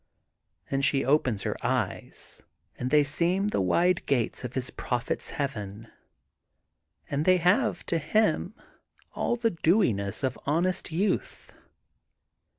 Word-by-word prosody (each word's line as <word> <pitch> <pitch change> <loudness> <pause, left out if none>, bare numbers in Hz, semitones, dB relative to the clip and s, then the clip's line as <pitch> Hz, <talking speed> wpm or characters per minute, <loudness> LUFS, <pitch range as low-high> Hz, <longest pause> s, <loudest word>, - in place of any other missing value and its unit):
' - - -54
' - - -33
And 135 0 0
she 135 0 +2
opens 130 -7 +2
her - - -2
eyes - - -3 0.3
and 125 - -3
they 150 +1 +5
seem 175 +7 +1
the 210 - 0
wide 175 - +2
gates 125 -3 0
of 125 0 -6
his 130 -1 -1
Prophet 125 0 -2
's - - -1
heaven. 115 -7 -5 1.2
And 145 +1 0
they 185 +2 +5
have, 195 +8 +2
to 165 - 0
him, 210 +3 +1 0.6
all - - 0
the 230 -1 0
dewiness 155 - +1
of 130 -1 -1
honest 175 +4 0
youth. 190 +6 -2
150 Hz, 140 wpm, -27 LUFS, 125-180 Hz, 1.2 s, they